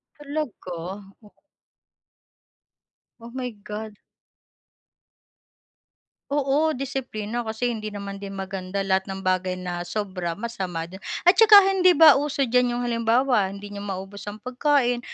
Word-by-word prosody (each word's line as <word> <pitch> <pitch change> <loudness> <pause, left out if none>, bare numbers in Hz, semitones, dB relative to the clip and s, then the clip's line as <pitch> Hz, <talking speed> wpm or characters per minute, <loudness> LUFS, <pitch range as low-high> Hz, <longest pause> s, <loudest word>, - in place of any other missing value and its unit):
Talaga? 290 - -5 0.5
O 210 - -17 1.9
Oh, 230 +1 -11
my 255 0 -4
God. 210 0 -8 2.3
Oo, 290 +2 +1
disiplina 245 -4 -4
kasi 235 +1 -2
hindi 215 -2 -5
naman 200 -1 -6
din 195 0 -7
maganda 195 0 -4
lahat 190 0 0
ng 190 0 -6
bagay 185 0 0
na 175 -1 -5
sobra 185 -3 -3
masama 190 -6 -4
din. 180 +3 -10 0.2
At 360 +2 +5
saka 440 -2 +9 0.2
hindi 365 -2 +4
ba 305 -4 +8
uso 285 -1 -1
diyan 250 -1 +2
'yung 245 - -2
halimbawa 235 -1 +2
hindi 200 +1 -9
niyo 205 - -7
maubos 200 0 -7
ang 205 - -5
pagkain 255 -1 +1
215 Hz, 125 wpm, -24 LUFS, 195-255 Hz, 2.3 s, saka